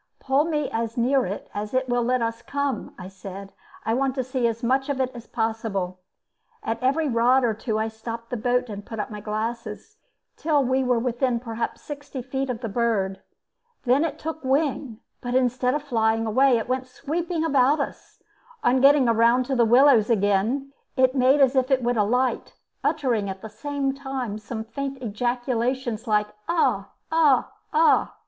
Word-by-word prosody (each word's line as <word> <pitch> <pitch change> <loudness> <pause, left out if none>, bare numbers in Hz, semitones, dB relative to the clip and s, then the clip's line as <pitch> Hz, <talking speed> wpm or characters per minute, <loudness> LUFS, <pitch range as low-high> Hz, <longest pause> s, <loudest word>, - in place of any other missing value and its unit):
"Pull 275 +3 +2
me 300 -3 -1
as 230 +1 -3
near 255 +1 +2
it 195 - -5
as 210 +3 -4
it 260 0 +1
will 245 0 +1
let 245 0 +1
us 230 0 -3
come," 280 0 -3
I 180 - -8
said. 195 +1 -9 0.3
"I 225 - +1
want 265 +1 0
to 260 - -1
see 255 -1 0
as 230 +1 -4
much 265 +3 +1
of 280 -2 -1
it 260 -1 0
as 240 -1 -10
possible." 220 -5 -2 0.6
At 225 +1 -3
every 285 +5 +2
rod 250 +1 +3
or 230 -2 +2
two 220 +1 -3
I 220 0 0
stopped 230 +1 -7
the - - -1
boat 245 +2 0
and 205 -2 -7
put 225 - -8
up 210 - -3
my 210 - -6
glasses, 225 - -5 0.4
till 300 -3 +2
we 260 +1 +1
were 250 -1 +2
within 245 +1 0
perhaps 230 -1 -4
sixty 285 -3 -7
feet 265 +1 -3
of 240 -2 -3
the 230 - -3
bird. 205 -4 0 0.6
Then 260 +4 +3
it 330 - -2
took 320 0 -6
wing, 265 -3 0 0.2
but 245 0 -3
instead 250 +1 +2
of 295 - -2
flying 225 -4 +1
away 250 +2 +4
went 255 +2 -2
sweeping 325 +5 -3
about 280 0 +3
us. 280 - -6 0.4
On 250 +1 +3
getting 280 0 +6
round 235 +2 +4
to 270 - -1
the 240 -2 +4
willows 245 -1 +5
again 225 +6 +1 0.2
it 260 0 +4
made 265 +2 +4
as 270 0 +4
if 260 -1 +2
it 265 -2 +2
would 245 +1 +1
alight, 245 +5 0 0.3
uttering 250 -10 0
at 190 +1 -7
the 220 - -6
same 275 +4 -2
time 265 -6 -4
some 220 +1 -5
faint 275 +4 -5
ejaculations, 240 +1 -2
like 210 -1 +2 0.2
"ah! 340 -1 +1 0.2
ah! 300 -6 +3 0.2
ah!" 460 0 +3
250 Hz, 185 wpm, -24 LUFS, 225-270 Hz, 0.6 s, getting